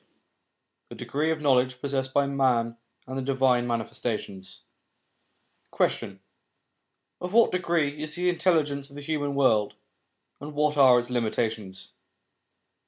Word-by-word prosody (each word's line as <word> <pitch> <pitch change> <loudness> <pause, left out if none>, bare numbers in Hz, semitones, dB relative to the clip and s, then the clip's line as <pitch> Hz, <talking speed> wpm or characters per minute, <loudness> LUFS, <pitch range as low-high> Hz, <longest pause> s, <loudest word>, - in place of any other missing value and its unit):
LVIII - - -47
THE - - -9
DEGREE 150 +3 -2
OF 160 -1 -1
KNOWLEDGE 130 -3 +2
POSSESSED 135 -1 -2
BY 140 +1 +2
MAN, 125 -4 +1 0.3
AND 130 +1 -6
THE - - -2
DIVINE 130 -2 +1
MANIFESTATIONS 110 -4 -4 1.1
Question. 95 -1 -1 1.0
Of 180 +2 -5
what 235 +1 +5
degree 165 -5 0
is 155 -1 -4
the 180 +1 -1
intelligence 160 -5 +1
of 140 - -15
the 145 - -8
human 145 -2 -2
world, 110 -7 +2 0.6
and 150 +1 -8
wljat 150 0 +1
are 130 -3 +7
its 120 +1 -7
limitations 110 -5 -3
135 Hz, 130 wpm, -26 LUFS, 120-150 Hz, 1.1 s, are